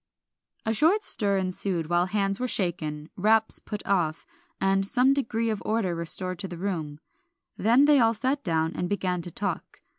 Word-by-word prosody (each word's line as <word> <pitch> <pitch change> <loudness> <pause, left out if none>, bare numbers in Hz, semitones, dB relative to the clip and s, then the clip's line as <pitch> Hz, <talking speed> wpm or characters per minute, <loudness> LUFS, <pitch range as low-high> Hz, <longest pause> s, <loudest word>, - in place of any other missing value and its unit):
A 220 - +1
short 335 - +3
stir 200 -3 +1
ensued 185 -2 -2
while 175 +2 +1
hands 195 0 0
were 255 - -1
shaken, 160 -7 -2
wraps 220 +3 +3
put 210 -1 -7
off, 170 -5 0 0.3
and 195 0 +2
some 250 +6 +3
degree 230 -4 -1
of 210 - -4
order 215 -5 0
restored 175 +2 -2
to 195 - -3
the 175 -2 -8
room, 165 -6 -4 0.6
then 240 +6 +4
they 290 -1 +5
all 225 -1 +3
sat 260 +6 -1
down 160 -2 0
and 175 - -3
began 185 -3 -1
to 175 - -6
talk. 200 +4 -5
195 Hz, 175 wpm, -26 LUFS, 175-225 Hz, 0.6 s, they